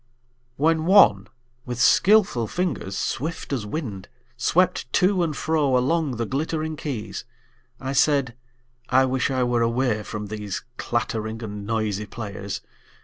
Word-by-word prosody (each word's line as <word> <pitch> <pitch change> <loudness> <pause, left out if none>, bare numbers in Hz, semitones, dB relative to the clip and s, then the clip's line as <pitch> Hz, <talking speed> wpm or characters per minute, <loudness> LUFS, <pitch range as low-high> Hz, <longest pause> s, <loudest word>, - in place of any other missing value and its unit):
WHEN 160 +2 +2
one 105 - +6 0.4
with 125 -1 -5
skillful 185 - +4
fingers 165 - -2
swift 155 +2 -3
as 115 -6 -2
wind 105 - -5 0.3
Swept 135 0 +1
to 185 0 +3
and 155 -4 -1
fro 150 -5 +2
along 145 +1 +1
the 115 0 -2
glittering 155 +5 -2
keys, 140 -8 -5 0.6
I 135 0 -3
said: 140 -3 +3 0.6
I 130 +1 +5
wish 130 0 0
I 130 -2 +1
were 120 -1 +1
away 115 -1 +1
from 105 0 -6
these 105 -1 -5
Clattering 115 -1 -2
and 105 -2 -6
noisy 105 -2 -1
players! 100 -3 -6
125 Hz, 135 wpm, -24 LUFS, 110-155 Hz, 0.6 s, one